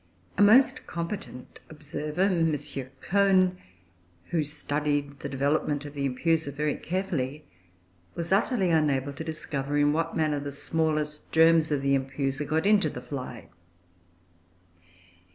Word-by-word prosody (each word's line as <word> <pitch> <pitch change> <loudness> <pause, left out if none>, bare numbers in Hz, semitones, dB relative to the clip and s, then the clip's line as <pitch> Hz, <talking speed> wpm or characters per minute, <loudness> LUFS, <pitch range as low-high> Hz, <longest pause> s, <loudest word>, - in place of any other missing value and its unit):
A - - +1
most 235 +6 +5
competent 170 -6 -6
observer, 150 +1 -5
M. 165 -6 +2 0.4
Cohn, 185 -1 +3 0.7
who 165 -3 +1
studied 145 -1 -2
the - - -5
development 145 +1 0
of 145 - -8
the 140 -1 -1
Empusa 160 +3 0
very 150 +1 -1
carefully, 155 -6 -3 0.7
was 170 +1 -4
utterly 195 -2 +2
unable 145 -3 +1
to 145 - -6
discover 145 -3 -3
in 145 0 +3
what 165 +2 -1
manner 155 -2 +1
the 140 0 -5
smallest 150 0 -2
germs 160 -1 +5
of 140 -2 0
the 140 0 +2
Empusa 135 +1 -1
got 160 +4 0
into 205 -1 +4
the - - -7
fly. 125 -4 -7
150 Hz, 130 wpm, -27 LUFS, 145-165 Hz, 0.7 s, most